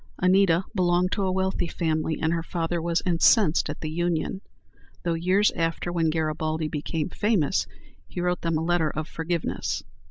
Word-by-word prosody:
Anita 185 -1 +4
belonged 180 -1 +2
to 205 - 0
a 185 - +1
wealthy 190 -1 0
family, 160 -2 -1
and 160 +1 +1
her 165 - 0
father 170 0 -2
was 170 0 0
incensed 175 -1 +4
at 150 - -6
the 155 - -3
union, 175 +3 -1 0.6
though 170 -2 0
years 185 +5 +3
after, 165 +1 -2
when 165 -2 +2
Garibaldi 155 0 -1
became 150 +1 -3
famous, 200 -7 +1 0.4
he 140 - -7
wrote 180 0 0
them 165 -1 0
a 160 - -2
letter 170 -2 +2
of 155 +1 -4
forgiveness. 165 +1 -2
170 Hz, 165 wpm, -25 LUFS, 160-180 Hz, 0.6 s, Anita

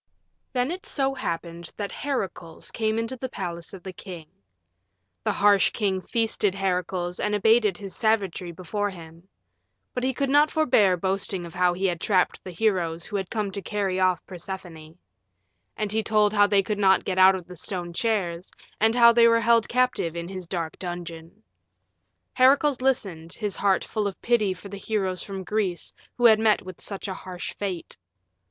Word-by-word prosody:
Then 250 +3 0
it 375 +5 -6
so 270 - 0
happened 170 -8 -5
that 205 -1 -4
Heracles 200 - -4
came 220 -1 -1
into 230 +3 -2
the 260 +1 -5
palace 170 -6 -5
of 190 -3 -10
the 190 - -7
king. 180 -4 -9 1.0
The 215 - +1
harsh 200 0 +4
king 195 -4 -1
feasted 220 -3 0
Heracles 180 -2 -2
and 210 0 0
abated 210 -2 +3
his 195 -2 -8
savagery 200 -6 0
before 205 +4 -3
him. 170 -1 -12 0.7
But 250 - -3
he 260 -1 0
could 275 +1 0
not 295 +2 +5
forbear 215 -12 +3
boasting 190 0 -2
of 170 - -10
how 180 -1 +2
he 190 +2 -2
had 175 -3 0
trapped 185 -4 +1
the - - -7
heroes 175 -4 0
who - - -7
had 190 -2 -2
come 210 -3 -2
to 200 - -4
carry 195 -2 -1
off 185 -1 +2
Persephone. 175 -3 -8 0.8
And 210 -2 -2
he 220 +1 +1
told 210 0 +2
how 205 -1 +5
they 200 -1 +3
could 205 +1 -3
not 190 -1 +4
get 185 -1 -1
out 190 +1 +7
of 180 -2 -6
the 180 - -11
stone 175 0 -4
chairs 185 -4 -1 0.3
and 225 +2 +3
how 235 -1 +8
they 235 0 +6
were 230 0 +4
held 230 0 +3
captive 250 -9 +1
in 170 0 -4
his 185 -2 -7
dark 165 -3 -4
dungeon. 175 +2 -7 0.9
Heracles 270 +1 +4
listened, 190 -11 -1
his 210 -4 -3
heart 195 -2 +2
full 210 -2 -1
of 195 - -6
pity 230 -5 +2
for 200 - -11
the 200 0 -7
heroes 195 -3 -2
from 195 -1 -6
Greece 195 -3 -2 0.2
who 245 - +2
had 220 -2 +7
met 220 -1 +3
with 185 -2 -10
such 200 -1 -4
a 190 - -3
harsh 185 -1 -7
fate. 190 -4 -5
195 Hz, 185 wpm, -25 LUFS, 180-220 Hz, 1.0 s, how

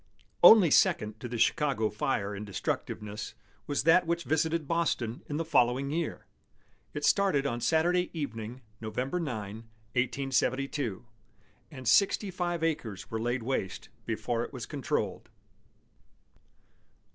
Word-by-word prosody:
Only 200 -8 +9
second 105 -4 +3
to 120 - -5
the 120 0 -4
Chicago 130 -2 +2
fire 105 -1 -1
in 100 - -6
destructiveness 105 +1 -4 0.3
was 145 -2 0
that 165 +2 +5
which 170 0 0
visited 160 0 0
Boston 140 -8 -1
in 145 - -3
the 165 - -2
following 135 -2 +2
year. 165 +1 -3 0.7
It 145 - -1
started 190 -9 +3
on 120 -3 -2
Saturday 175 +4 +2
evening, 125 -5 -5 0.2
November 125 +9 -2
9, 110 - -4 0.4
1872, 130 -2 -1 0.6
and 130 -2 -8
sixty 200 - +3
five 175 -2 -2
acres 120 - -3
were 110 0 -2
laid 120 +1 -1
waste 115 -6 -3 0.2
before - - -1
it - - -7
was - - -6
controlled. - - -3
135 Hz, 125 wpm, -29 LUFS, 115-165 Hz, 0.7 s, Only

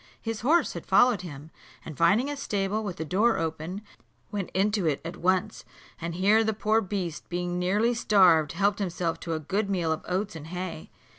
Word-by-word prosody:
His 225 -1 -4
horse 315 +9 +3
had - - -8
followed 245 -6 +4
him, 155 -3 -9 0.3
and 155 - -7
finding 200 - +3
a 290 - -3
stable 210 -5 -2
with 195 -4 -4
the 160 - -5
door 210 +8 +2
open, 165 +5 -4 0.5
went 200 -3 -3
into 200 -1 +1
it 145 -3 +1
at 165 - -5
once; 185 +1 0 0.4
and 170 0 -4
here 205 +5 +4
the 220 0 0
poor 220 +1 +2
beast, 185 -5 -4
being 175 0 -2
nearly 205 +7 +2
starved, 185 -9 +4
helped 200 +3 +1
himself 175 -3 -2
to 165 -1 -3
a - - -2
good 195 +7 -2
meal 175 -5 0
of 160 - -2
oats 190 +1 -2
and 160 -1 -8
hay. 180 - -6
185 Hz, 195 wpm, -27 LUFS, 170-210 Hz, 0.5 s, followed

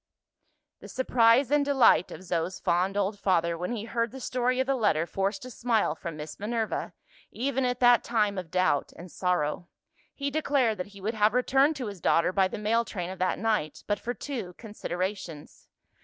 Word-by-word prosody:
The - - -11
surprise 250 0 +3
and 295 -1 +4
delight 265 -10 +4
of - - -9
Zo's 175 0 -2
fond 185 +3 0
old 200 +1 -1
father, 170 -4 +1
when 180 +4 -4
he 215 - -5
heard 230 +1 -1
the 265 - -9
story 250 0 0
of 260 - +2
the 275 - +1
letter, 205 - +1
forced 195 +5 -2
a 255 - -8
smile 225 -8 +1
from 165 0 -7
Miss 150 0 -8
Minerva, 220 +1 -2 0.4
even 265 +1 -1
at 250 0 -1
that 245 -1 +6
time 210 -4 0
of 180 -3 -8
doubt 185 -5 +1
and 175 0 -11
sorrow. 175 -2 -1 0.5
He 280 0 -3
declared 275 -7 +1
that 180 - -3
he - - -12
would 215 +4 -2
have 215 +1 +2
returned 270 +4 +3
to 260 - -4
his 200 -5 -7
daughter 170 +3 +2
by 190 -1 +3
the - - -6
mail 225 +3 +1
train 185 -5 -5
of 190 - -9
that 185 0 0
night, 210 -8 -1
but 205 -1 -1
for 245 +1 -4
two 225 -7 -5
considerations. 185 -6 -6
210 Hz, 195 wpm, -28 LUFS, 180-245 Hz, 0.5 s, that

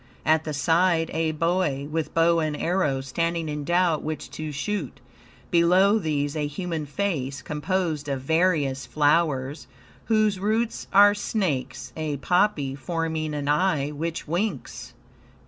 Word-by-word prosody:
At 160 0 +3
the 155 - -3
side 165 +2 +2
a 160 0 0
boy, 155 -3 0
with 160 -1 -3
bow 165 0 +4
and 155 -2 -1
arrows, 150 -7 0
standing 165 +2 -1
in 150 -1 -4
doubt 175 0 +2
which 155 -1 -5
to 155 -1 -5
shoot. 155 - -3 0.5
Below 185 +5 +4
these 145 -4 -1
a 150 -1 -1
human 160 0 -4
face, 145 -6 -2
composed 155 -1 -2
of 135 -2 -2
various 150 -3 +1
flowers, 145 -2 +1 0.4
whose 215 -3 +2
roots 220 +3 -1
are 205 +1 +7
snakes, 160 - -2
a 155 -2 -3
poppy, 160 -3 +1
forming 160 +1 -3
an 145 -1 -3
eye, 150 -2 +2
which 165 +3 -4
winks. 175 - -3
160 Hz, 135 wpm, -25 LUFS, 145-180 Hz, 0.5 s, are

